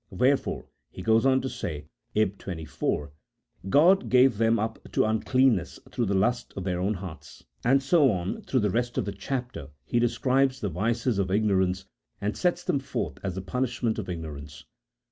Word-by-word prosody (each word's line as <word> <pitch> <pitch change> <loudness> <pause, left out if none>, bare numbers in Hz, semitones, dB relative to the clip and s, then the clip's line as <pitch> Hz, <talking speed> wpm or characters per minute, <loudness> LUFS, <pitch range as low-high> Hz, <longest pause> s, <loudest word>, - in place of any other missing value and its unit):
" - - -46
Wherefore," 130 +2 +1 0.2
he 90 - -9
goes 110 +5 +4
on 130 0 +4
to 130 - -3
say 75 - -5 0.3
(ib. 100 -2 +1
24), 80 -4 -3 0.3
" 95 - -13
God 180 - +5
gave 125 -3 +5
them 115 0 +3
up 110 +1 -2
to - - +3
uncleanness 110 -2 +2
through 120 - -1
the 100 - +1
lusts 120 +6 +1
of 95 - -3
their 90 -2 -1
own 100 +4 0
hearts; 90 -3 -9
" - - -41
and 135 +3 +3
so 145 0 +5
on, 90 -1 -3
through 130 - 0
the 105 -2 +1
rest 120 +3 -1
of 125 - +1
the 100 - -3
chapter, 125 - -4 0.2
he 120 - +1
describes 130 +3 +2
the 105 - -2
vices 115 +5 0
of 95 -1 0
ignorance, 95 -2 +1 0.3
and 105 +1 -2
sets 175 -1 0
them 140 - +1
forth 85 - -4
as 95 -3 -3
the 95 - -3
punishment 120 +1 -1
of 95 - -5
ignorance. 75 -4 -7
110 Hz, 190 wpm, -27 LUFS, 95-130 Hz, 0.3 s, God